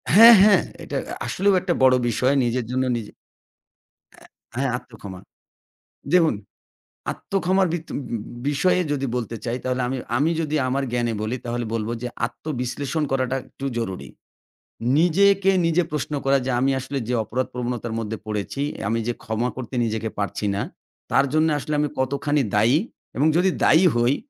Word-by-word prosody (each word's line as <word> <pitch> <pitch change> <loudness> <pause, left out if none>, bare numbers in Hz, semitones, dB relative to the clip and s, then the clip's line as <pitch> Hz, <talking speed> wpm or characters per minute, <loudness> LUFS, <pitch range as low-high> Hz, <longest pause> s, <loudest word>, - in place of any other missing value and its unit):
হ্যাঁ, 230 +3 +11
হ্যাঁ। 210 0 +6 0.2
এটা - - -4 0.3
আসলেও 200 +1 +2
একটা 175 -1 0
বড়ো 130 -1 +6
বিষয় 125 +4 +2
নিজের 120 0 -1
জন্য 130 +1 +1
নিজে 110 -3 -7 1.4
অ্যা - - -9
হ্যাঁ, 135 -2 0
আত্ম 125 - -16
ক্ষমা। 95 -2 -8 0.9
দেখুন 165 -7 +4 0.8
আত্ম - - -18
ক্ষমার 190 +1 +3
ভিত 165 -2 -3
উ - - -1 0.5
বিষয়ে 165 +6 +2
যদি 135 -1 -1
বলতে 115 -1 -3
চাই 120 0 -1
তাহলে 130 0 -1
আমি 130 - -2 0.2
আমি 145 +6 +2
যদি 155 -1 -1
আমার 135 +2 0
জ্ঞানে 120 -1 0
বলি 110 +4 -2
তাহলে 120 0 -2
বলব 110 -1 -2
যে, 125 - -2 0.2
আত্মবিশ্লেষণ 140 +1 -4
করাটা 130 -1 0
একটু 135 - -10
জরুরি। 95 -5 -4 0.9
নিজেকে 195 +3 +4 0.2
নিজে 165 +2 +3
প্রশ্ন 150 0 -3
করা 135 0 +4
যে, - - 0
আমি 135 +2 +2
আসলে 135 +2 -4
যে, 125 - 0
অপরাধ 125 +4 -2
প্রবণতার 120 -2 -3
মধ্যে 110 -1 -3
পড়েছি, 105 +6 -3 0.3
আমি 115 +1 0
যে, 120 - +1
ক্ষমা 110 +2 -1
করতে 130 -1 -6
নিজেকে 110 0 -2
পারছি 105 +1 -2
না, 100 - -1 0.5
তার 140 - +4
জন্যে 155 +1 +3
আসলে 150 +1 -3
আমি 150 - +1
কতখানি 140 +2 0
দায়ী? 115 +6 +4 0.4
এবং 145 - +2
যদি 185 +2 +4
দায়ী 165 +4 +6
হই 120 +3 +3
130 Hz, 165 wpm, -23 LUFS, 120-155 Hz, 1.4 s, হ্যাঁ